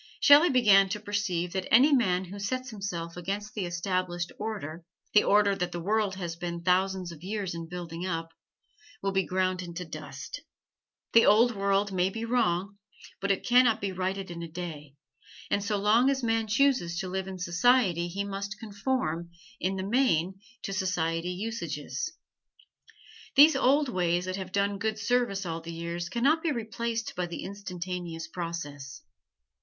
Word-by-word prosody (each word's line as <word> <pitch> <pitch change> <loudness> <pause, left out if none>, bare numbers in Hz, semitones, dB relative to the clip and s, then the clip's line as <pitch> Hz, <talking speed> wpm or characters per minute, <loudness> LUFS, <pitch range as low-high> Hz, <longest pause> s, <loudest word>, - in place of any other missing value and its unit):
Shelley 295 +4 +7
began 205 -7 +5
to 210 - -2
perceive 200 -5 -2
that 190 -1 -3
any 270 +6 +7
man 190 -8 +2
who 195 +3 -9
sets 255 +5 -3
himself 175 -5 -5
against 200 +4 -4
the 195 -5 -2
established 175 0 -2
order 190 -7 -5 0.3
the 210 - +6
order 205 -1 +4
that 180 -2 -2
the 175 - -4
world 205 +2 0
has 175 -3 -4
been 170 0 -5
thousands 185 0 +1
of 160 -2 -12
years 195 -2 -3
in 165 -1 -6
building 175 -1 -6
up 165 -3 -3 0.7
will 195 - +1
be 190 0 +2
ground 185 0 0
into 175 0 -6
the 160 - -15
dust. 145 - -7 0.7
The 230 - +7
old 230 +3 +5
world 200 0 +1
may 185 0 +1
be 225 +3 -5
wrong, 200 -5 0 0.4
but 200 - -2
it 195 - 0
can 245 +1 +6
not 225 -2 +3
be 200 -2 -2
righted 190 0 -3
in 170 0 -6
a 170 - -5
day, 155 -4 -7 0.6
and 200 - +1
so 205 0 0
long 220 +6 +4
as 270 -2 0
a - - +1
man 225 -1 +1
chooses 225 -7 +2
to 190 0 -2
live 190 +1 -3
in 190 -1 -6
society 180 0 +2
he 195 +3 -3
must 200 +1 -5
conform, 200 -6 -2 0.3
in 190 +1 -1
the 190 - -3
main, 195 -6 +1 0.2
to 195 - -3
society 175 -3 -1
usages. 225 - -4 1.2
These 300 +3 +8
old 285 +3 +3
ways 180 -5 0
that 185 0 -3
have 190 -1 -6
done 200 0 0
good 220 +1 -1
service 220 -4 0
all 165 -1 -3
the 165 +1 -7
years 170 +1 -4
can 235 +5 -2
not 310 +4 +4
be 325 - 0
replaced 230 -1 -3
by 180 -1 -2
the 170 - -6
instantaneous 180 -4 -5
process. 160 -5 -6
190 Hz, 175 wpm, -28 LUFS, 175-215 Hz, 1.2 s, These